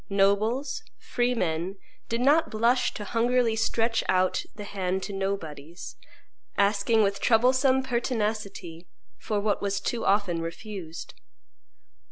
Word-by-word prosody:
Nobles, 215 Hz, -, +1 dB, 0.2 s
free 245 Hz, 0 st, -1 dB
men, 175 Hz, -1 st, -1 dB, 0.3 s
did 230 Hz, +1 st, -1 dB
not 295 Hz, +5 st, +4 dB
blush 235 Hz, +4 st, +2 dB
to 210 Hz, -, -5 dB
hungrily 235 Hz, +1 st, +1 dB
stretch 225 Hz, +1 st, +1 dB
out 185 Hz, 0 st, +2 dB
the 210 Hz, -, -7 dB
hand 190 Hz, -2 st, -2 dB
to 200 Hz, -, -5 dB
nobodies, 170 Hz, -5 st, -5 dB, 0.6 s
asking 205 Hz, +2 st, +3 dB
with 200 Hz, 0 st, 0 dB
troublesome 255 Hz, +3 st, +3 dB
pertinacity 210 Hz, -8 st, -3 dB, 0.3 s
for 210 Hz, -2 st, -1 dB
what 205 Hz, 0 st, 0 dB
was 200 Hz, -1 st, -1 dB
too 230 Hz, +3 st, -2 dB
often 195 Hz, -4 st, +1 dB
refused. 170 Hz, 0 st, -7 dB
210 Hz, 120 wpm, -27 LUFS, 195-235 Hz, 0.6 s, not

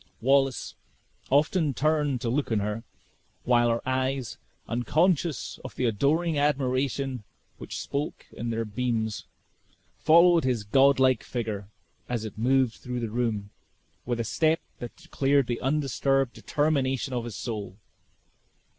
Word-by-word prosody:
Wallace 135 Hz, +1 st, +2 dB, 0.6 s
often 150 Hz, +1 st, +2 dB
turned 150 Hz, -4 st, +1 dB
to 120 Hz, -, -1 dB
look 140 Hz, -1 st, -1 dB
on 110 Hz, -, +2 dB
her, 105 Hz, +2 st, -2 dB, 0.6 s
while 120 Hz, -1 st, +3 dB
her 115 Hz, +2 st, -1 dB
eyes, 130 Hz, -1 st, -1 dB, 0.3 s
unconscious 155 Hz, +5 st, 0 dB
of -, -, -8 dB
the 130 Hz, -, -1 dB
adoring 145 Hz, +8 st, +1 dB
admiration 135 Hz, -3 st, 0 dB, 0.4 s
which -, -, -6 dB
spoke 145 Hz, +2 st, -4 dB
in 115 Hz, -, -5 dB
their 115 Hz, 0 st, -1 dB
beams, 110 Hz, 0 st, -2 dB, 0.7 s
followed 170 Hz, +1 st, +6 dB
his 125 Hz, -5 st, 0 dB
godlike 130 Hz, +2 st, +4 dB
figure 110 Hz, -5 st, -4 dB, 0.4 s
as 120 Hz, -3 st, -2 dB
it 110 Hz, -, -7 dB
moved 130 Hz, +1 st, +2 dB
through 125 Hz, -1 st, -5 dB
the 115 Hz, -3 st, -3 dB
room 110 Hz, -4 st, -2 dB, 0.5 s
with 120 Hz, -1 st, -2 dB
a -, -, +1 dB
step 160 Hz, +8 st, +1 dB, 0.2 s
that 120 Hz, -, -7 dB
declared 140 Hz, 0 st, +1 dB
the 120 Hz, -1 st, -3 dB
undisturbed 135 Hz, -1 st, +1 dB
determination 135 Hz, -3 st, 0 dB
of 120 Hz, -2 st, -2 dB
his 115 Hz, -4 st, -6 dB
soul. 105 Hz, -5 st, -5 dB
130 Hz, 130 wpm, -27 LUFS, 115-140 Hz, 0.7 s, followed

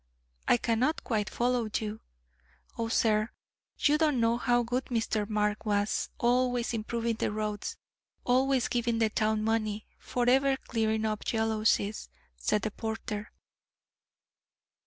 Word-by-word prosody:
"I -, -, +5 dB
cannot 240 Hz, +7 st, 0 dB
quite 210 Hz, -3 st, -1 dB
follow 240 Hz, -2 st, 0 dB
you." 215 Hz, 0 st, -5 dB, 0.7 s
"Oh, 230 Hz, -, -2 dB
sir, 215 Hz, -1 st, +2 dB, 0.5 s
you 300 Hz, +1 st, +3 dB
don't 300 Hz, -5 st, +2 dB
know 230 Hz, 0 st, +3 dB
how 240 Hz, 0 st, +2 dB
good 245 Hz, +2 st, -1 dB
Mr. 225 Hz, -3 st, -1 dB
Mark 210 Hz, 0 st, 0 dB
was: 205 Hz, -1 st, 0 dB
Always 245 Hz, 0 st, +1 dB
improving 230 Hz, +1 st, -2 dB
the -, -, 0 dB
roads; 210 Hz, -1 st, -3 dB, 0.5 s
always 260 Hz, 0 st, +2 dB
giving 235 Hz, -1 st, 0 dB
the 220 Hz, -1 st, +2 dB
town 215 Hz, 0 st, +1 dB
money; 215 Hz, -1 st, 0 dB
forever 265 Hz, +2 st, +2 dB
clearing 220 Hz, -3 st, -1 dB
up 215 Hz, -1 st, -2 dB
jealousies," 220 Hz, -, 0 dB, 0.3 s
said 195 Hz, -, 0 dB
the 215 Hz, -, -1 dB
porter. 220 Hz, -1 st, -5 dB
225 Hz, 125 wpm, -29 LUFS, 215-245 Hz, 0.7 s, I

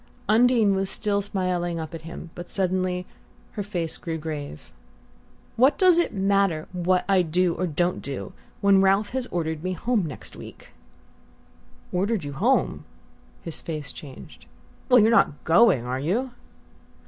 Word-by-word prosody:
Undine 225 Hz, -1 st, +4 dB
was 195 Hz, 0 st, -1 dB
still 205 Hz, -3 st, -1 dB
smiling 180 Hz, -4 st, -2 dB
up 160 Hz, -1 st, -6 dB
at 165 Hz, -, -7 dB
him; 165 Hz, +1 st, -9 dB
but 175 Hz, -, -9 dB
suddenly 185 Hz, -1 st, -1 dB, 0.5 s
her 210 Hz, -, -4 dB, 0.4 s
grew 165 Hz, -2 st, -3 dB
grave. 150 Hz, -, -7 dB, 0.9 s
"What 260 Hz, +5 st, +4 dB
does 365 Hz, -3 st, +5 dB
it 345 Hz, -, +1 dB
matter 195 Hz, -5 st, +1 dB
what 180 Hz, +1 st, +1 dB
I 195 Hz, -2 st, +4 dB
do 175 Hz, +1 st, +1 dB
or 185 Hz, -, -2 dB
don't 175 Hz, +3 st, -1 dB
do, 130 Hz, -9 st, -6 dB, 0.3 s
when 200 Hz, -1 st, +5 dB
Ralph 195 Hz, +2 st, +3 dB
has 260 Hz, -1 st, -3 dB
ordered 160 Hz, -2 st, -3 dB
me 185 Hz, 0 st, -1 dB
home 215 Hz, -1 st, 0 dB
next 145 Hz, -, -8 dB
week?" -, -, -12 dB, 1.2 s
"Ordered 195 Hz, +1 st, 0 dB
you 145 Hz, -1 st, -5 dB
home?" 235 Hz, -, +1 dB, 0.6 s
His 165 Hz, -, -6 dB
face 155 Hz, -3 st, -5 dB
changed. 135 Hz, -4 st, -12 dB, 0.4 s
"Well, 250 Hz, -, +7 dB
you're 220 Hz, +1 st, +5 dB
not 190 Hz, -10 st, +3 dB
going, 165 Hz, -, +4 dB
are 130 Hz, +1 st, -2 dB
you?" 220 Hz, -, -1 dB
185 Hz, 150 wpm, -25 LUFS, 160-205 Hz, 1.2 s, Well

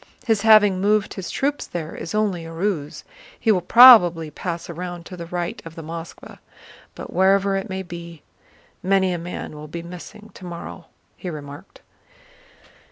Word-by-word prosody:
His 220 Hz, -4 st, +1 dB
having 210 Hz, -4 st, +5 dB
moved 210 Hz, +1 st, +1 dB
his 190 Hz, -, -6 dB
troops 285 Hz, +1 st, -2 dB
there 165 Hz, -2 st, -6 dB
is 170 Hz, -, -6 dB
only 200 Hz, -6 st, 0 dB
a 165 Hz, -, -9 dB
ruse; 165 Hz, -3 st, -3 dB, 0.4 s
he 225 Hz, -, +2 dB
will 185 Hz, -4 st, +2 dB
probably 175 Hz, -10 st, +7 dB
pass 170 Hz, +2 st, -5 dB
round 175 Hz, 0 st, -7 dB
to 185 Hz, -, -9 dB
the 170 Hz, -1 st, -8 dB
right 175 Hz, 0 st, -4 dB
of 165 Hz, -1 st, -11 dB
the 165 Hz, -, -8 dB
Moskvá. 165 Hz, +1 st, -9 dB, 0.6 s
But -, -, -9 dB
wherever 195 Hz, +1 st, +3 dB
it 195 Hz, 0 st, -3 dB
may 190 Hz, 0 st, -4 dB
be, 170 Hz, -2 st, -10 dB, 0.6 s
many 190 Hz, -1 st, +2 dB
a 175 Hz, -, -3 dB
man 175 Hz, -1 st, -7 dB
will 150 Hz, 0 st, -9 dB
be 170 Hz, +2 st, -7 dB
missing 205 Hz, +5 st, -11 dB
tomorrow!" 175 Hz, -1 st, -9 dB, 0.3 s
he 180 Hz, -, -6 dB
remarked. 145 Hz, -3 st, -10 dB
175 Hz, 165 wpm, -22 LUFS, 170-195 Hz, 0.6 s, probably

